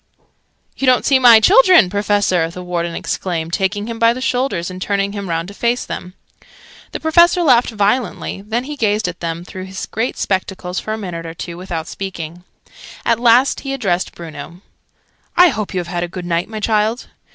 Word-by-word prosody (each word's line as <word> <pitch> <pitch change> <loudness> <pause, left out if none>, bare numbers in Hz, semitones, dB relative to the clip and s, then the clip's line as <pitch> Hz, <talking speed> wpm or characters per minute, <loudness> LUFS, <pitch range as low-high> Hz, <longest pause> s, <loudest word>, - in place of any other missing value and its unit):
"You 270 - -1
don't 255 -1 +4
see 270 -2 +4
my 240 -3 +8
children, 370 - +6
Professor!" 205 -4 +1
the 180 +2 -8
Warden 170 -1 -3
exclaimed, 170 -3 -3
taking 205 +2 -1
him 230 0 -6
by 230 0 +4
the 250 - -6
shoulders 250 -9 -1
and 185 0 -9
turning 200 0 0
him 200 -2 -6
round 165 +1 -2
to - - -10
face 235 +3 -1
them. 180 +1 -7 0.8
The - - -5
Professor 340 +2 +4
laughed 250 -6 +4
violently: 210 -1 -1
then 225 +4 -2
he 295 +3 -6
gazed 215 -5 0
at 175 -1 -6
them 170 0 -4
through 185 0 -8
his 190 0 -6
great 225 +4 -3
spectacles, 185 -1 -2
for 215 - -5
a 220 - -2
minute 170 -5 -6
or 165 - -8
two, 170 0 -7
without 175 -3 -5
speaking. 175 -3 -7 0.6
At 230 -1 +2
last 245 +3 +4
he 275 -1 -5
addressed 195 -9 -1
Bruno. 170 +1 -9 0.8
"I 360 0 +8
hope 215 -8 -3
you 185 - -2
have 175 - -4
had 175 0 -3
a 175 - -2
good 175 +1 -7
night, 170 +2 -1
my 220 -1 -5
child?" 220 +2 0
200 Hz, 195 wpm, -18 LUFS, 175-235 Hz, 0.8 s, my